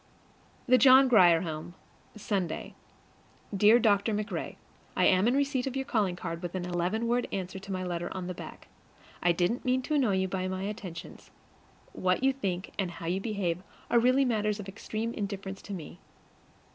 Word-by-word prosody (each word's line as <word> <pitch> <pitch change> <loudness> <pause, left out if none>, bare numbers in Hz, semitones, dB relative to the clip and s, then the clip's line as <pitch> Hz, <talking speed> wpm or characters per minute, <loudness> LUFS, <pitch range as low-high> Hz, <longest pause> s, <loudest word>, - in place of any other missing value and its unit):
THE 255 +1 +5
JOHN 265 0 +7
GRIER 175 -8 +6
HOME, 165 +1 -6 0.4
Sunday. 195 -6 -3 0.8
Dear 210 +4 +6
Dr. 210 -1 +2
MacRae: 210 0 -4 0.4
I - - +3
am 185 +3 +4
in 245 - +3
receipt 275 -2 0
of 265 - -4
your 270 0 -2
calling 210 -9 0
card 165 -1 -5
with 175 0 -5
an 180 -1 -3
eleven 180 +6 -1
word 240 +1 +1
answer 190 0 -4
to 195 +1 -9
my 185 -1 -2
letter 175 -1 -3
on 185 -1 -5
the 180 - -4
back. - - -10 0.5
I 175 - +4
didn't 175 +8 0
mean 255 0 +1
to 305 - -3
annoy 255 -10 +3
you 190 0 +1
by 185 0 -2
my 185 0 -3
attentions. 195 -5 -7 0.6
What 185 +6 0
you 270 0 +4
think 190 -8 -3
and 190 -2 0
how 170 -1 -9
you 180 +3 -1
behave 190 -5 -2 0.3
are 235 - +6
really 255 +3 +4
matters 210 -3 0
of 200 - -7
extreme 220 +3 -4
indifference 195 -2 -5
to 205 - -8
me. 175 0 -9
195 Hz, 185 wpm, -29 LUFS, 180-235 Hz, 0.8 s, JOHN